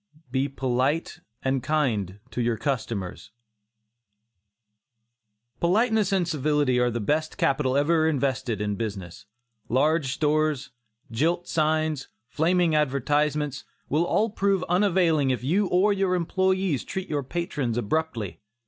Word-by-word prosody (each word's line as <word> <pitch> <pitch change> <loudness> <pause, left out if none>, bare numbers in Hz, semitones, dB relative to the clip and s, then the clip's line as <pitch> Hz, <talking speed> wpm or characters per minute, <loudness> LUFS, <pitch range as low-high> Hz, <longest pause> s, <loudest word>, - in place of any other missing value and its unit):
BE 135 +2 0
POLITE 135 +4 -1 0.2
AND 135 0 0
KIND 120 - 0
TO 125 - -2
YOUR 120 -1 0
CUSTOMERS. 110 -6 -3 2.3
Politeness 215 +3 +2
and 185 -3 +1
civility 145 -4 +1
are 125 0 +3
the 120 0 -3
best 155 +8 -1
capital 140 -6 +1
ever 160 +2 +3
invested 130 -6 -1
in 105 0 -1
business. 100 -6 -6 0.4
Large 145 +2 +2
stores, 150 -2 0 0.4
gilt 165 +9 0
signs, 155 -2 0 0.2
flaming 170 +3 +2
advertisements, 150 0 0 0.3
will 155 +3 +2
all 220 +1 +1
prove 195 -3 +1
unavailing 175 -6 +2
if 125 -1 -1
you 190 +9 +2
or 190 +4 +3
your 190 -2 +1
employees 185 -3 0
treat 190 -1 -5
your 145 -2 -1
patrons 140 -5 -3
abruptly. 120 - -2
150 Hz, 120 wpm, -25 LUFS, 130-170 Hz, 2.3 s, are